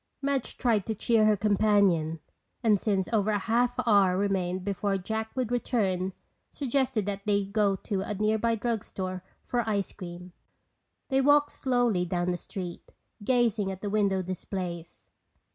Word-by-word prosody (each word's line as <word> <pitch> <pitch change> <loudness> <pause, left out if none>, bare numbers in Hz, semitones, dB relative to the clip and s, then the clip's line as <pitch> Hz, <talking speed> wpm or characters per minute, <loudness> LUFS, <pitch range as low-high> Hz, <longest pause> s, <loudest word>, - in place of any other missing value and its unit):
Madge 275 -2 -1
tried 225 -6 +2
to 220 - -1
cheer 220 +1 +3
her 210 -1 +4
companion, 200 -6 +2 0.5
and 215 -3 +4
since 195 -3 0
over 215 -1 +2
a 210 - +2
half 240 +4 +1
hour 200 -5 +4
remained 185 -2 0
before 200 0 0
Jack 220 +4 -3
would 250 -3 -1
return, 195 -7 0 0.4
suggested 265 -5 0
that 200 -1 -3
they 200 -1 +2
go 200 0 +1
to 190 0 -3
a 205 +2 -3
nearby 220 +3 +1
drug 225 -1 -2
store 185 -1 -5 0.2
for 245 -1 -1
ice 200 -2 -1
cream. 180 -1 -9 0.8
They 270 0 +3
walked 290 +1 +4
slowly 245 -8 +1
down 175 0 -1
the 175 - -2
street, 175 0 -7 0.3
gazing 230 -4 +2
at 190 0 -8
the 205 - -3
window 200 -3 +1
displays. 175 - -6
205 Hz, 155 wpm, -28 LUFS, 185-230 Hz, 0.8 s, her